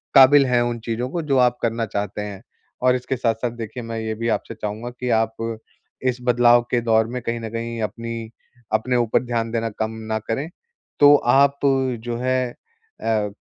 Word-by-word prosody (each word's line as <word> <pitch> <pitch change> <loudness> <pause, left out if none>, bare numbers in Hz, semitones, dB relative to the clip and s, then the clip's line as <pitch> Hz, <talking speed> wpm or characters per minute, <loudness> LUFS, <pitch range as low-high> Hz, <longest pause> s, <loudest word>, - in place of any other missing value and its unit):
काबिल 135 +1 +8
हैं 125 -1 +2
उन 120 -1 -1
चीज़ों 120 +2 -2
को, 170 +3 -2
जो 140 -3 +1
आप 125 -1 +3
करना 115 0 0
चाहते 105 0 -3
हैं। 100 -2 -6 0.4
और 125 0 +5
इसके 125 +1 -2
साथ-साथ, 115 0 0
देखिए, 115 +1 -7
मैं 115 0 -5
ये 110 0 -3
भी 115 +1 -3
आपसे 115 - -2
चाहूँगा 110 +3 -5
कि 125 -1 -2
आप 115 0 0 0.5
इस 125 -1 +1
बदलाव 120 0 +5
के 120 -1 +2
दौर 110 -1 +3
में 125 +1 -5
कहीं 115 +1 -3
न 115 -1 -5
कहीं 115 0 -4
अपनी 115 +1 -4 0.4
अपने 125 +3 +1
ऊपर 120 +1 +2
ध्यान 115 -2 -2
देना 115 0 -1
कम 110 0 -1 0.2
ना 110 - +1
करें, 135 +9 -3 0.5
तो 145 0 +8
आप 140 +2 +3
जो 125 -4 0
है 130 0 0 0.5
अ, 110 -2 0
115 Hz, 190 wpm, -22 LUFS, 115-125 Hz, 0.5 s, काबिल